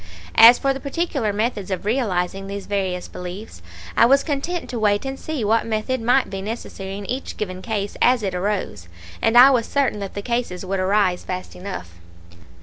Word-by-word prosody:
As 235 +2 +9
for 275 -1 +1
the 270 - -6
particular 280 -6 -1
methods 210 -2 -2
of 190 0 -3
realizing 195 -5 -1
these 200 0 -6
various 190 -3 -2
beliefs, 180 - -8 0.3
I 230 - +6
was 275 +2 +4
content 330 +4 -3
to 240 - -3
wait 205 +2 +1
and 270 0 -4
see 310 -7 -4
what 225 +2 +2
method 225 +3 -1
might 250 +3 +3
be 195 0 -5
necessary 195 -2 -6
in 205 - -7
each 255 +6 -4
given 185 -3 -4
case 205 -1 -3
as 245 -2 +4
it 190 -2 -2
arose; 180 - -3 0.3
and 225 +2 +3
I 260 +3 +10
was 240 -4 +1
certain 275 -7 0
that 200 -1 -6
the 200 - -4
cases 235 -7 -2
would 195 +1 -2
arise 185 -1 +1
fast 185 0 -6
enough. 180 - -7
210 Hz, 190 wpm, -22 LUFS, 190-250 Hz, 0.3 s, I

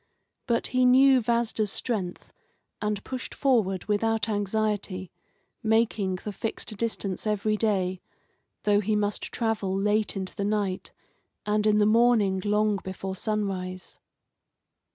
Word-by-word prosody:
But 235 -1 +1
he 255 0 +3
knew 260 +1 +6
Vasda's 225 -2 0
strength, 195 -7 -3 0.5
and 210 -1 -2
pushed 255 -1 -6
forward 215 -9 +1
without 220 +1 +1
anxiety, 205 -2 -1 0.5
making 220 -4 +1
the 210 +3 -6
fixed 215 +1 -5
distance 210 -2 -2
every 215 0 +1
day, 190 -4 0 0.6
though 205 -1 +4
he 210 +1 0
must 210 0 0
travel 210 -5 -1
late 210 +2 +1
into 190 -1 -5
the 200 - -2
night, 200 -2 -1 0.5
and 210 0 +1
in 210 0 +4
the 210 - +4
morning 215 -4 +3
long 210 0 +2
before 190 0 -5
sunrise. 190 -3 -3
210 Hz, 125 wpm, -27 LUFS, 195-225 Hz, 0.6 s, knew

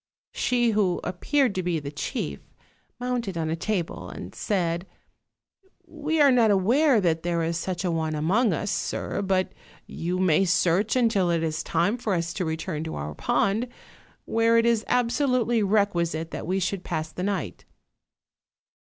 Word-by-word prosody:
She 240 -2 +1
who 200 -4 +1
appeared 260 +6 +1
to 185 - -1
be 175 -2 -1
the 140 -1 -6
chief 75 - -4 0.6
mounted 245 -7 -2
on 160 -1 -1
a - - 0
table 165 - -3
and 90 - -8
said: 175 -3 -1 1.0
"We 315 -1 -2
are 285 -2 +7
not 235 -3 +4
aware 235 +7 +4
that 165 -4 +1
there 170 -1 0
is 165 +1 -1
such 180 +2 -3
a 175 - +1
one 160 -1 -1
among 195 +10 +2
us, 200 +4 -2
sir, - - -2
but 190 -1 0 0.3
you 175 +2 -3
may 185 -1 +3
search 180 +4 +2
until 225 -8 +2
it 165 -1 +1
is 155 -1 -1
time 175 +9 0
for 210 -5 0
us 170 0 -2
to 185 - -2
return 160 0 -3
to 160 - -5
our 75 +1 -5
pond; 205 - 0 0.6
where 230 0 +3
it 230 - +3
is 230 -2 +2
absolutely 245 -1 +2
requisite 175 -6 +1
that - - -5
we 190 +2 0
should 190 0 -2
pass 160 -2 -3
the 180 - -6
night." 190 -4 -3
185 Hz, 165 wpm, -25 LUFS, 165-230 Hz, 1.0 s, are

